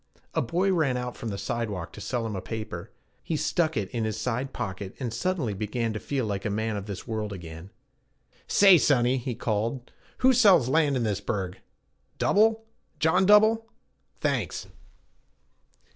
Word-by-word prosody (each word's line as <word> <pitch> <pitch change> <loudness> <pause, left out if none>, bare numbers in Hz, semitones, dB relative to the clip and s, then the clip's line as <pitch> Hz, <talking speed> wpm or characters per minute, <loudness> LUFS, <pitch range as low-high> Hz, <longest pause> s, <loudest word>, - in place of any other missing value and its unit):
A - - +1
boy 180 +10 +1
ran 145 -8 +1
out 125 0 -4
from 115 - -5
the 100 - -4
side 115 +3 -2
walk 90 -5 -5
to 105 - -9
sell 115 +3 -2
him 110 -2 -3
a 95 - -3
paper. 110 -4 -6 0.3
He 160 - -2
stuck 160 +1 0
it 100 -3 -1
in 115 -2 -2
his 110 -1 -2
side 125 +2 -2
pocket, 100 -4 -5
and 120 -4 -3
suddenly 150 - -1
began 110 +3 -2
to 110 - -4
feel 135 0 -2
like 100 -2 -3
a - - -1
man 110 +1 -1
of 100 0 -5
this 100 -3 -7
world 110 -2 -3
again. 85 -1 -9 0.8
'Say, 195 -4 +7
sonny,' 130 -3 +3
he 125 -1 -4
called; 115 +4 -2 0.3
'who 260 +1 +5
sells 195 - +6
land 145 -1 +2
in 120 - 0
this 105 -3 -1
burg? 95 -3 -3 0.6
Dubell 220 +2 +3 0.4
John 160 +5 +3
Dubell? 215 +2 +5 0.5
Thanks.' - - -1
120 Hz, 175 wpm, -27 LUFS, 105-155 Hz, 0.8 s, Say